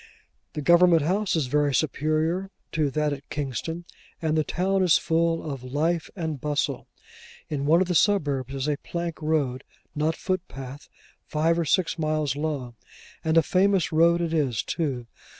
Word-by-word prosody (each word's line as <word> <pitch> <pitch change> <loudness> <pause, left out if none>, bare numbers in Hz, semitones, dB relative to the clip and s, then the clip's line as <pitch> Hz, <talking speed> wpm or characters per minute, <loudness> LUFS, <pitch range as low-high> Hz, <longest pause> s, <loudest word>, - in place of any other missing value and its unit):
The 150 - -4
Government 170 -1 +6
House 190 +5 +1
is 155 -4 +1
very 145 +1 +1
superior 155 +5 0 0.2
to 155 -3 +1
that 150 +2 0
at 140 0 -9
Kingston, 150 +4 -4 0.3
and 160 -1 0
the 155 - +2
town 190 +4 0
is 180 -4 +5
full 165 0 0
of 135 -4 -5
life 155 +6 -1
and 160 -7 -4
bustle. 150 -1 -1 0.6
In 145 -2 -2
one 165 +4 +5
of - - -7
the 180 - 0
suburbs 145 - +1
is 135 +1 -2
a 150 -1 0
plank 170 0 -5
road—not 150 +1 -2
footpath—five 155 0 -3
or 170 - 0
six 170 +3 +1
miles 155 -3 0
long, 145 -5 -3 0.5
and 160 0 +2
a 165 - +6
famous 195 -1 +2
road 170 +2 +4
it 165 -1 -1
is 140 -8 +1
too. 135 -8 -2
155 Hz, 155 wpm, -25 LUFS, 145-170 Hz, 0.6 s, Government